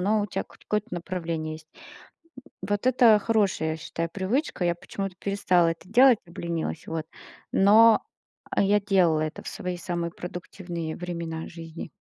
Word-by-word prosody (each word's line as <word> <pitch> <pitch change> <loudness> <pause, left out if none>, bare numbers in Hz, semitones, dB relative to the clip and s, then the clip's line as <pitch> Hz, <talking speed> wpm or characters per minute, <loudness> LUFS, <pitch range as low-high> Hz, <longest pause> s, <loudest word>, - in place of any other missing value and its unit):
но 210 +4 +2
у - - -2
тя 195 - -3
кот - - -21
какое-то 210 0 0
направление 170 -3 -3
есть. 155 0 -13 0.8
М, - - -20 0.2
вот 205 +3 -1
это 240 -4 +6
хорошая, 200 -6 +1
я 160 - -4
считаю, 165 +1 -4
привычка. 200 - -1
Я 175 0 +1
почему-то 195 +2 -5
перестала 185 -3 +2
это 165 +2 -10
делать, 245 +1 +6
обленилась, 170 - -4
вот. 160 -1 -3 0.5
Но, 220 +3 +6 0.5
а, - - +2
я 205 +1 +3
делала 180 -6 +3
это 155 -1 -3
в - - -9
свои 180 -4 -4
самые 170 -1 -3
продуктивные 175 -2 -6
времена 170 -2 -5
жизни. 165 -1 -8
180 Hz, 160 wpm, -26 LUFS, 165-205 Hz, 0.8 s, это